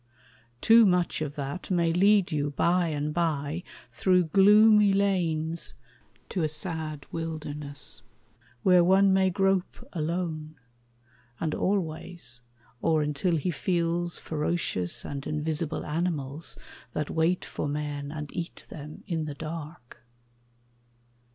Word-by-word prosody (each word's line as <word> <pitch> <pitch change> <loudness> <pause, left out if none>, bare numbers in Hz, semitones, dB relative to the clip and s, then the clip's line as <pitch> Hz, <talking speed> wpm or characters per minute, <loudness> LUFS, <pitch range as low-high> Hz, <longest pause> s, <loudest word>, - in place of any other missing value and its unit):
Too 230 +1 +7
much 180 -3 +1
of 150 -1 -3
that 140 +5 -5
May 170 -3 +2
lead 195 +1 +4
you 145 -1 0
bye 175 +4 +2
and 150 -1 -2
bye 155 -1 -1 0.3
through 185 -1 +3
gloomy 210 +4 +6
lanes 170 -5 0 0.5
To 180 - -1
a 155 - +1
sad 155 -1 -4
wilderness, 150 -5 -3 0.6
where 180 -2 +6
one 190 +2 +5
may 190 0 +4
grope 195 +5 0
Alone, 160 -2 -3 0.8
and 160 -2 -1
always, 170 -8 -3 0.4
or 155 -2 +2
until 150 +4 0
he 170 +3 0
feels 170 +1 -1
Ferocious 150 - -2
and 140 -1 -5
invisible 155 +1 -2
animals 155 -2 -2 0.4
That 150 - -2
wait 165 +3 +1
for - - -4
men 145 -1 -3
and 150 -2 -7
eat 170 0 -5
them 150 0 -9
in 165 -3 -2
the 150 -2 -5
dark. 155 -5 -8
165 Hz, 120 wpm, -28 LUFS, 150-180 Hz, 0.8 s, Too